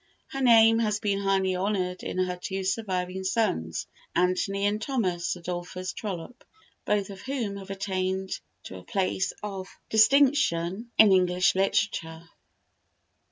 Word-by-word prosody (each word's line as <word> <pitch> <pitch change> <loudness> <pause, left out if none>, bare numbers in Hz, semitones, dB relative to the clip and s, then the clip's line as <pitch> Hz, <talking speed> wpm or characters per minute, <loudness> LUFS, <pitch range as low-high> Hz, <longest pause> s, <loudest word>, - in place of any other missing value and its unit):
Her 270 - -5
name 225 -2 +6
has 210 -2 0
been 200 -2 0
highly 195 -1 +1
honoured 185 -1 -1
in - - -5
her 185 -1 0
two 190 +2 -4
surviving 190 -2 -2
sons, 190 - -1 0.3
Anthony 185 +2 +1
and 210 +1 0
Thomas 185 -12 -1
Adolphus 180 +1 -5
Trollope, 205 +4 -6 0.4
both 205 -1 0
of 195 0 -10
whom 240 -7 -3
have 195 -1 -10
attained 190 -1 -2 0.2
to 95 - -8
a 90 - -11
place 190 -1 -1
of 195 -2 -5 0.2
distinction 220 -5 +3
in 215 -2 +8
English 180 0 +3
literature. 170 -4 0
195 Hz, 130 wpm, -27 LUFS, 180-210 Hz, 0.4 s, in